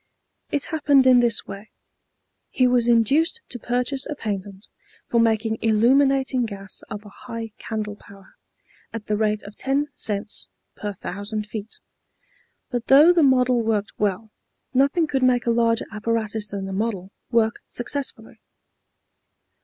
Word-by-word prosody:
It 290 -2 -1
happened 285 -4 +4
in 255 -1 +7
this 235 -2 +1
way: 195 +2 -9 0.8
He 255 - +2
was 245 -1 +3
induced 275 - +3
to 245 - -6
purchase 250 +3 -1
a 300 - -4
patent 200 -3 -5 0.4
for 235 - +1
making 220 -1 +1
illuminating 260 +3 +3
gas 200 -1 -7
of 210 -1 -7
a - - -10
high 230 0 -7
candle 210 -2 -4
power, 195 -1 -17 0.6
at 225 -2 -6
the 210 - 0
rate 215 0 0
of 205 +1 -11
ten 280 +2 -1
cents 210 -2 -4 0.3
per 205 -1 -5
thousand 205 +3 -5
feet. 215 0 -7 0.9
But 240 -1 -3
though 295 +6 +7
the 345 - +3
model 255 -3 +4
worked 215 -2 -1
well, 210 +1 -1 0.4
nothing 280 +6 +3
could 275 -3 -1
make 250 -1 +3
a 235 - +2
larger 230 0 +2
apparatus 220 -1 -2
than 195 -1 -5
the 195 - -5
model 195 -2 -3 0.2
work 225 -2 +1
successfully. 275 +3 -4
230 Hz, 145 wpm, -23 LUFS, 210-255 Hz, 0.9 s, in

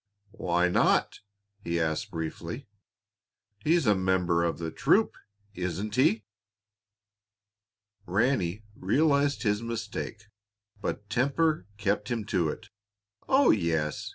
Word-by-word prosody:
"Why 90 -2 +1
not?" 90 - +2 0.4
he 85 0 -1
asked 80 -1 -1
briefly. 85 - -5 1.0
"He's 165 -1 +3
a 105 - +5
member 95 -3 +1
of 85 - 0
the 80 -1 -4
troop, - - +2 0.4
isn't 90 +4 -3
he?" 115 -3 +3 1.8
Ranny 105 -1 +1
realized 140 +7 +2
his 105 -1 +1
mistake, 115 -2 -5 0.6
but 105 0 -4
temper 140 - +1
kept 105 +1 -1
him 115 -3 -2
to 85 -5 +2
it. 100 - -7 0.6
"Oh, 270 +1 +6
yes! 80 -6 0
105 Hz, 105 wpm, -28 LUFS, 85-120 Hz, 1.8 s, Oh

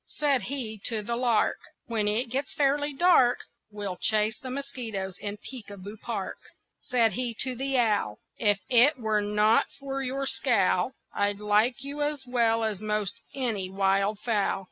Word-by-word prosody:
Said 285 -4 +1
he 240 -6 -4
to 220 -3 -1
the 235 +3 -2
lark: 235 -3 +2 0.3
"When 220 -3 -1
it 225 +3 0
gets 270 +2 -3
fairly 290 +1 +2
dark 275 -5 +4 0.3
We'll 205 -3 -5
chase 215 0 +1
the 265 -3 -7
mosquitoes 240 -9 -5
in 205 0 -4
Peek 235 -1 -9
a 200 - -9
Boo 200 +3 -8
Park." 215 -3 -5 0.4
Said 235 -4 +2
he 245 -2 -2
to 260 - +1
the 270 +1 -1
owl: 210 - +1 0.2
"If 205 -3 +2
it 260 +5 +6
were 220 -3 0
not 210 +2 +3
for 275 -1 -4
your 270 +1 -2
scowl 225 -4 +2 0.2
I'd 205 0 0
like 210 +5 +2
you 285 +2 -5
as 290 -2 -2
well 230 -2 +2
as 215 -3 -1
most 215 0 -1
any 225 -8 -1
wild 195 +2 +1
fowl." 210 -3 0
230 Hz, 165 wpm, -27 LUFS, 210-260 Hz, 0.4 s, it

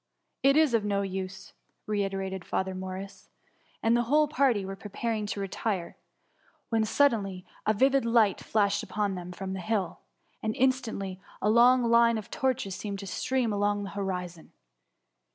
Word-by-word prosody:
" - - -51
It 275 +2 +5
is 310 -5 +4
of 225 -2 +3
no 200 -1 0
use,^ 190 0 -5 0.3
reiterated 195 -2 -2
Father 190 0 -2
Morris, 190 +1 -7 0.5
and 225 +1 +4
the 240 0 +2
whole 300 +1 +4
party 265 -9 +2
were 195 0 -5
preparing 210 +2 -3
to 205 - -3
retire, 195 -2 -3 0.7
when 225 -3 +2
suddenly 205 -7 +1 0.2
a 215 - +4
vivid 270 +4 +3
light 230 -4 +3
flashed 205 -2 +1
upon 205 0 -2
them 180 -1 -6
from 190 +1 -5
the 190 - -4
hill, 195 -1 -2 0.4
and 220 0 -2
instantly 225 -8 0 0.2
a 210 - +2
long 245 +2 +6
line 235 0 +4
of 215 - -7
torches 260 -7 -1
seemed 200 +1 -5
to 195 - -7
stream 245 +2 -1
along 205 0 0
the 195 - -6
horizon. 180 -4 -5
205 Hz, 160 wpm, -28 LUFS, 190-235 Hz, 0.7 s, long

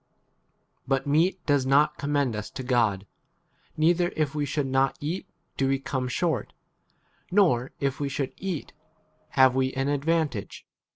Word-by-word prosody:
But 135 0 +1
meat 160 +7 +2
does 145 -3 +3
not 140 +3 +3
commend 140 -4 0
us 105 0 -5
to 135 - -7
God; 115 -6 +1 0.7
neither 175 +3 +3
if 155 -2 0
we 145 -1 -1
should 145 0 -1
not 135 0 +1
eat 160 +6 -4 0.3
do 135 - +1
we 135 0 +2
come 130 -1 -3
short; 140 -2 -1 0.8
nor 160 -11 +3
if 140 -1 -1
we 140 -1 -1
should 135 -1 -3
eat 185 -6 -4 0.6
have 130 -1 +7
9 130 - -4
we 130 0 0
an 135 +1 -1
advantage. 145 -5 -1
140 Hz, 155 wpm, -26 LUFS, 130-155 Hz, 0.8 s, have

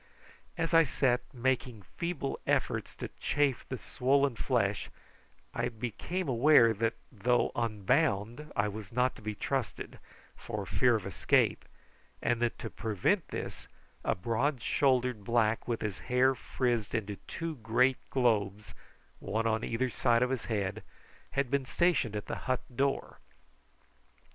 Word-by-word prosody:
As 165 0 -1
I 165 - +8
sat 130 -4 +2
making 125 -3 -1
feeble 165 - -4
efforts - - 0
to - - -6
chafe 145 -4 0
the 130 - -3
swollen 135 +2 +1
flesh 110 -6 0 0.6
I 120 +1 -1
became 125 - -4
aware 125 -2 +6
that 115 +1 0 0.2
though 120 +2 +1
unbound 115 +3 0
I 100 - +2
was 105 -1 -7
not 125 +2 +1
to - - -12
be 105 0 -4
trusted, 130 +1 -3 0.4
for - - -5
fear - - +3
of - - -3
escape, - - +2 0.5
and 120 -1 0
that 120 -1 0
to 115 - -6
prevent 115 - 0
this - - -6 0.4
a - - +1
broad 120 +8 0
shouldered 125 -5 +2
black 115 0 +1
with 120 -2 -1
his 105 -3 -3
hair 125 +2 +3
frizzed 120 -4 -1
into 105 -3 -2
two 165 -2 -4
great 120 +3 +2
globes, 105 -5 +1 0.5
one 110 +3 -2
on 110 0 +1
either 120 +2 -1
side 120 0 +3
of 125 - 0
his 130 -3 -2
head, 100 -4 -2 0.5
had 140 -2 0
been 140 -1 +2
stationed 155 - +1
at 105 - -3
the - - -4
hut 130 - +1
door. 140 +1 -1
120 Hz, 145 wpm, -31 LUFS, 110-135 Hz, 0.6 s, I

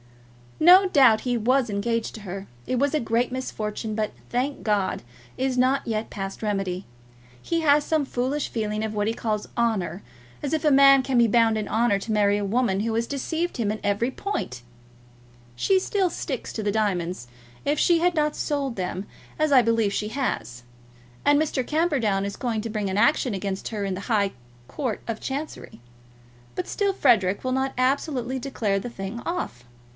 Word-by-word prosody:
No 365 +4 +8
doubt 255 -9 +5
he 245 -1 0
was 250 +2 +2
engaged 225 +3 -1
to 220 - -9
her. 195 0 -7 0.2
It 255 - 0
was 285 +2 +1
a 305 - +2
great 235 +1 0
misfortune, 220 -4 -4
but, 215 -1 -1 0.2
thank 260 +4 -1
God, 205 -3 0 0.4
is 260 -1 0
not 260 +2 +2
yet 220 -1 -2
past 195 +1 -5
remedy. 195 -3 -2 0.6
He 335 -1 -1
has 295 -1 +4
some 310 -2 +1
foolish 265 +3 -1
feeling 215 -1 -2
of 220 -1 -3
what 205 0 0
he 225 - +1
calls 215 -2 -2
honour; 205 -7 0 0.4
as 290 +1 -2
if 315 - 0
a 300 - +4
man 275 0 +7
can 260 -1 -1
be 235 -1 +6
bound 225 0 +3
in 215 - -3
honour 225 -2 +2
to 220 - -5
marry 205 -1 +3
a 205 - -2
woman 200 -2 +1
who 225 +1 -1
has 230 +1 0
deceived 320 +5 -2
him 215 -4 0
in 215 - -4
every 205 +5 +1
point! 260 - -4 0.9
She 380 - +3
still 380 -1 0
sticks 265 -6 -4
to 220 - -4
the 205 - +1
diamonds, 185 - -1 0.4
if 290 +1 +1
she 345 -1 +4
has 355 +1 +2
not 300 -2 +1
sold 280 -4 -2
them, 185 +1 -3 0.3
as 310 -1 +2
I 265 -2 +7
believe 225 -3 +1
she 210 +1 -2
has; 120 - -3 0.6
and 290 0 +5
Mr. 275 -5 -1
Camperdown 275 - +1
is 200 - -4
going 230 -4 -2
to 225 - -5
bring 210 -2 -2
an 190 - -2
action 240 0 +3
against 195 0 -3
her 210 -3 -3
in 195 -1 -2
the 190 - -6
High 200 -3 +1 0.4
Court 245 - -3
of 230 -2 -3
Chancery. 280 - -6 0.8
But 180 - -3
still 400 -1 0
Frederic 205 - +3
will 255 - -1
not 265 +1 0
absolutely 260 -1 0
declare 220 -7 -1
the 245 - -6
thing 205 +1 -6
off. 125 - -4
230 Hz, 190 wpm, -25 LUFS, 205-275 Hz, 0.9 s, No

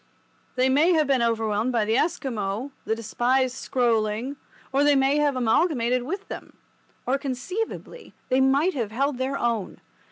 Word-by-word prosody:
They 255 +1 +3
may 300 +7 +4
have 310 -2 +3
been 270 -3 +2
overwhelmed 225 0 0
by 230 -3 +1
the 220 +1 +1
Esquimaux, 260 - -1
the 220 - 0
despised 245 +3 0
Skroeling—or 245 +4 -1
they 290 0 +5
may 270 +2 +3
have 295 -2 +2
amalgamated 250 0 +2
with 375 +11 -5
them—or 270 +2 -7
conceivably 365 - -5
they 260 0 +3
might 280 +7 +3
have 235 -6 -2
held 270 +4 -1
their 265 +2 -1
own. 230 -5 -2
260 Hz, 140 wpm, -25 LUFS, 230-285 Hz, -, they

